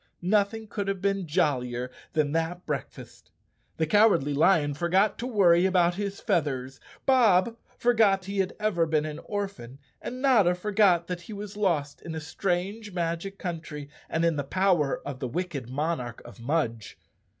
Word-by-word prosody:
Nothing 210 +3 +1
could 205 -1 -4
have 195 -1 -1
been 195 -1 -1
jollier 130 -7 0 0.2
than 150 -3 +1
that 165 +3 -2
breakfast. 145 -3 -6 0.5
The 160 - +1
Cowardly 170 -6 +4
Lion 150 -1 +3
forgot 180 +7 +1
to 245 - -3
worry 185 -6 +4
about 175 -2 +3
his 200 +1 -4
feathers, 135 -5 -1 0.3
Bob 230 -5 +4 0.2
forgot 215 -6 +3
he 200 +1 -3
had 190 -1 0
ever 195 -6 +1
been 155 -1 +1
an 150 -1 -5
orphan, 195 - -5 0.2
and 250 - -6
Notta 225 -10 +4
for¬ 210 +4 -5
got 180 -5 +5
that 180 0 -5
he 215 - -9
was 205 0 -7
lost 170 -9 -1
in 165 -1 -6
a - - -3
strange 195 +6 -3
magic 170 +3 -3
country 160 -5 -6 0.2
and 165 +1 0
in 165 -2 +1
the 145 - -1
power 170 -2 +1
of 140 -3 -5
the 130 - -3
wicked 150 -4 -4
monarch 130 -4 -3
of 120 0 -12
Mudge. 115 -5 -2
175 Hz, 165 wpm, -27 LUFS, 150-200 Hz, 0.5 s, got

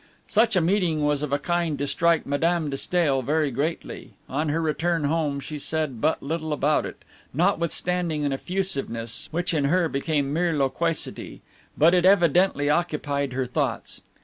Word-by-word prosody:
Such 220 0 +2
a 180 - +4
meeting 165 -4 +1
was 145 -1 +1
of 150 -2 -3
a 140 - +2
kind 170 0 -1
to 140 - -2
strike 165 +2 +2
Madame 160 +2 0
de - - -2
Stael 150 -5 +1
very 150 +2 0
greatly; 150 +7 -4
on 150 +3 -1
her 155 +3 0
return 165 +1 0
home 145 -1 0
she 150 +2 -6
said 150 -5 -3
but 155 +2 +1
little 160 +2 -3
about 150 +1 +1
it, - - -12 0.3
notwithstanding 170 -2 0
an 140 - 0
effusiveness 135 - -3
which 175 +3 -1
in 145 -3 +1
her 170 +4 +2
became 145 -1 -1
mere 170 -1 +1
loquacity; 155 +4 -2 0.3
but 165 +4 +5
it 180 -1 +3
evidently 180 -4 +4
occupied 145 -4 0
her 130 0 -1
thoughts. 125 - -3
155 Hz, 165 wpm, -25 LUFS, 145-170 Hz, 0.3 s, but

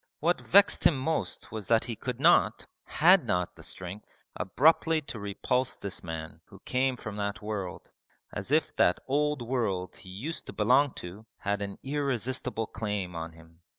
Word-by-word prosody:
What 170 +3 +1
vexed 200 +2 +5
him 155 - +5
most 155 +5 -2
was 110 -3 -5
that 115 0 +4
he 115 - -4
could 125 +2 -5
not 170 +5 +4 0.2
had 180 +3 +5
not 90 -1 -1
the - - -13
strength 95 +3 -8
abruptly 160 - +3
to 135 -6 -8
repulse 105 +5 -1
this 100 -1 -5
man 80 -2 -6
who - - -14
came 130 0 +1
from 110 -3 -7
that 100 0 -3
world: 105 -4 -5 0.4
as - - -5
if - - +2
that 90 - +4
old 145 -1 +1
world 105 -8 -2
he 95 - -13
used 125 - -5
to - - -7
belong 135 +2 +3
to 100 +6 -8
had 100 0 -2
an 100 -1 -4
irresistible 130 -4 -1
claim 105 -5 -3
on 80 0 -5
him. 80 0 -18
110 Hz, 170 wpm, -29 LUFS, 95-135 Hz, 0.4 s, vexed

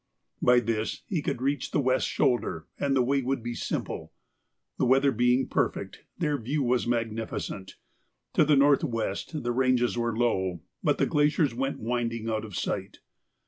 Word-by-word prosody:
By 125 0 +6
this 110 -1 -2
he 180 -7 -1
could 125 - -3
reach 140 -1 0
the - - 0
west 130 -1 +2
shoulder 120 - 0
and 140 -1 +1
the 130 - +4
way 135 +2 +1
would 130 -1 -2
be 120 0 -3
simple. - - -4 0.7
The - - +3
weather 135 +2 +4
being 125 +2 +2
perfect, - - -1 0.2
their 150 -4 0
view 140 +6 -1
was 125 -1 +1
magnificent. 115 -4 -3 0.6
To - - +5
the 150 0 +4
north 140 +2 +5
west 115 - -3
the 120 - 0
ranges 125 -1 +2
were 115 -1 -1
low, 95 -8 0 0.2
but - - +2
the - - +2
glaciers 150 -2 +2
went 135 +3 -2
winding 115 -1 -2
out 110 0 -2
of 105 -4 -9
sight. - - -3
125 Hz, 170 wpm, -28 LUFS, 115-135 Hz, 0.7 s, By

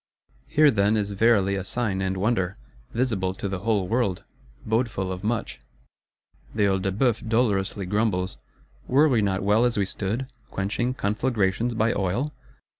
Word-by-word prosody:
Here, 150 -1 +5
then 105 -1 +2
is 105 -1 -1
verily 100 -1 +3
a 95 - -2
sign 100 -2 -2
and 95 0 -1
wonder; 95 -2 0 0.3
visible 110 -7 -1
to 100 - -4
the 95 -1 -3
whole 100 -2 0
world; 110 -5 0 0.4
bodeful 110 -4 0
of 90 +1 -6
much. 115 +1 -2 1.0
The 105 - +2
Œil 95 -1 +2
de 95 - 0
Bœuf 115 +1 0
dolorously 105 -4 +1
grumbles; 100 -1 0 0.5
were 145 +5 +5
we 125 -7 +3
not 100 -2 0
well 105 +3 +3
as 120 -1 +1
we 100 - +2
stood,—quenching 115 +2 -3
conflagrations 110 0 0
by 115 +1 +2
oil? 105 +10 -1
105 Hz, 150 wpm, -25 LUFS, 95-120 Hz, 1.0 s, Here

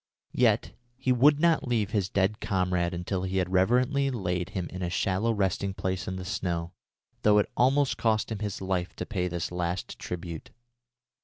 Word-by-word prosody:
Yet - - +2 0.3
he 130 0 0
would 145 +4 +5
not 165 -4 +3
leave 110 -4 0
his 100 -3 0
dead 100 +3 +1
comrade 90 -4 0
until 90 +1 -3
he 95 +1 -2
had 90 -1 0
reverently 125 +9 +3
laid 90 -8 -2
him 90 -2 -3
in 90 - -6
a 90 - -1
shallow 95 +5 +1
resting 100 -2 0
place 95 -2 -2
in 95 - -3
the 95 0 -6
snow, 85 -3 -2 0.5
though 105 0 +5
it 105 - +2
almost 135 +2 +3
cost 110 -1 +1
him 110 - -3
his 105 -2 -4
life 95 -2 -2
to - - -4
pay 90 -4 -1
this 85 -1 -3
last 90 0 -3
tribute. 85 -2 -6
95 Hz, 180 wpm, -28 LUFS, 90-110 Hz, 0.5 s, would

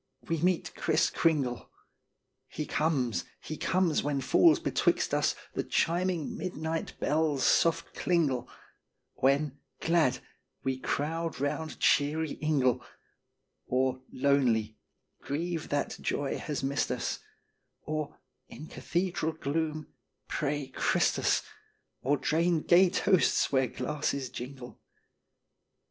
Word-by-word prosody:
we 165 -1 0
meet 180 0 +1
" - - -31
Kriss - - +2
Kringle"; 145 -7 +1 0.8
He 150 - -5
comes, 140 -8 0 0.2
he 155 - -6
comes 180 -1 +1
when 145 -1 -1
falls 325 - +5
betwixt - - +1
us - - +2 0.2
The - - -1
chiming 175 -1 0
midnight 160 -2 -3
bells' 150 -3 +1
soft 165 0 +3
klingle, 140 -9 +1 0.6
When, 140 +1 +1 0.2
glad, 160 -6 +2 0.5
we 130 -1 -1
crowd 165 +5 -2
round 145 +2 -2
cheery 150 +2 +2
ingle, 140 -5 +2 0.8
Or, 130 0 +1
lonely, 125 -6 +2 0.5
grieve 165 +3 -3
that 145 0 -1
joy 140 -1 -1
has 150 -4 -4
missed 140 +1 0
us; - - -2 0.6
Or, 155 -1 -4 0.3
in 155 - -9
cathedral 175 -1 -2
gloom, 155 0 -3 0.3
pray 145 -1 -1
Christus; - - +2 0.6
Or 145 +3 +2
drain 165 +3 +1
gay 180 +3 +5
toasts 185 0 +3
where 130 -2 +3
glasses 140 -1 -2
jingle. 125 0 -8
150 Hz, 110 wpm, -30 LUFS, 135-165 Hz, 0.8 s, falls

